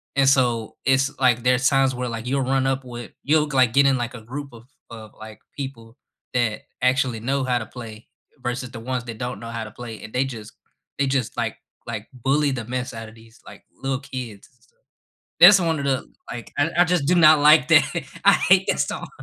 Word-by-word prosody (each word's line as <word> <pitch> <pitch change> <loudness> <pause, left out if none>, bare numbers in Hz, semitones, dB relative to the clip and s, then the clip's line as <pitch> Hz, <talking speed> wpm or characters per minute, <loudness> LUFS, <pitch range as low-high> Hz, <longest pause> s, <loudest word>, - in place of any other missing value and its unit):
And 135 -1 +4
so, 120 -5 +1
it's, 135 +2 +2
like, 120 -3 +3
there's 125 +2 +3
times 135 -1 +2
where, 125 0 -3
like, 115 +1 -6
you'll 135 +2 0
run 135 +1 0
up 135 0 -1
with 120 -1 -9
you'll 150 +2 +2
g 145 - -6
like, 125 -3 +4
get 140 0 +5
in, 135 -1 +3
like, 120 -1 -4
a 115 - -9
group 140 +4 -8
of 115 -1 -13 0.3
of, 110 -2 -10
like, 110 0 -11 0.2
people 125 -4 -8 0.4
that 120 -3 0 0.2
actually 125 -2 +1
know 135 +4 -1
how 125 -1 +1
to 110 - -6
play, 110 -1 -11 0.4
versus 125 +1 -3
the 120 - -8
ones 125 +1 -3
that 115 -2 -7
don't 125 -1 -5
know 115 - -8
how 115 -1 -4
to 105 - -10
play, 115 0 -9
and 110 - -10
they 125 - +2
just 115 -5 -8 0.5
they 140 - +2
just, 130 -4 -1
like - - -2 0.3
like 110 -2 -5
bully 135 +4 +1
the 125 -4 -4
mess 125 +2 -4
out 115 -1 -8
of 110 - -16
these, 115 +1 -19
like, - - -13 0.2
little 135 -1 -1
kids. 125 -7 -8 0.9
That's 200 -2 +9
one 165 -2 0
of - - -4
the 135 -1 -1 0.3
like, 120 -2 -8
I 145 +3 +2
I - - +7
just 175 -5 0
do 180 - +3
not 155 -3 +7
like 150 0 +6
that, 160 -2 +6 0.4
I 200 - +7 0.2
hate 190 +1 +5
that - - +1
song. - - -3
125 Hz, 220 wpm, -22 LUFS, 115-140 Hz, 0.9 s, That's